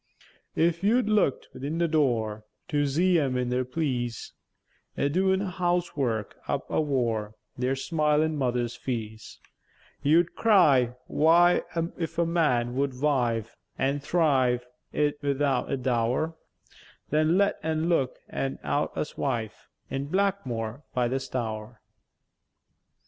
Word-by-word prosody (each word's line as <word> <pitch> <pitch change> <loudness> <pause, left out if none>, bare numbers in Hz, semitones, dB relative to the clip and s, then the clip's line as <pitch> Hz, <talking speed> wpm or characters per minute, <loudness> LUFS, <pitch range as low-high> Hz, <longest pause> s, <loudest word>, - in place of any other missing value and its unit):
An' - - +2
if 170 +1 +1
you 235 +5 +4
look'd 210 - +1
'ithin 140 +5 -4
their 170 0 +2
door, 115 -9 0 0.3
To 145 -3 +1
zee 175 +5 +3
em 135 -4 0
in 125 -1 -1
their 125 +1 +1
pleäce, 125 -4 -3 0.7
A 140 - +1
doèn 190 +3 +2
housework 175 - -1
up - - -2
avore 115 -8 0 0.2
Their 130 +2 0
smilèn 155 +2 +1
mother's 125 -4 -1
feäce; 110 -3 -5 0.6
You'd 165 +4 +3
cry, 140 - +4
"Why, 170 +3 +4 0.4
if 165 -2 -4
a 170 - +3
man 140 -8 +1
would 135 -2 -1
wive 120 -6 0 0.2
An' 140 +2 0
thrive, 135 -6 +2 0.3
'ithout 145 -3 0
a 135 - +1
dow'r, 125 +5 0 0.8
Then 155 +3 +3
let 200 0 +2
en 160 +1 -1
look 140 -7 +1
en 135 0 -3
out 145 - -1
a - - -1
wife 115 -6 -3 0.2
In 135 +1 -2
Blackmwore 145 - -1
by 125 -1 +2
the 135 +2 0
Stour." 110 -3 -5
140 Hz, 125 wpm, -27 LUFS, 125-165 Hz, 0.8 s, you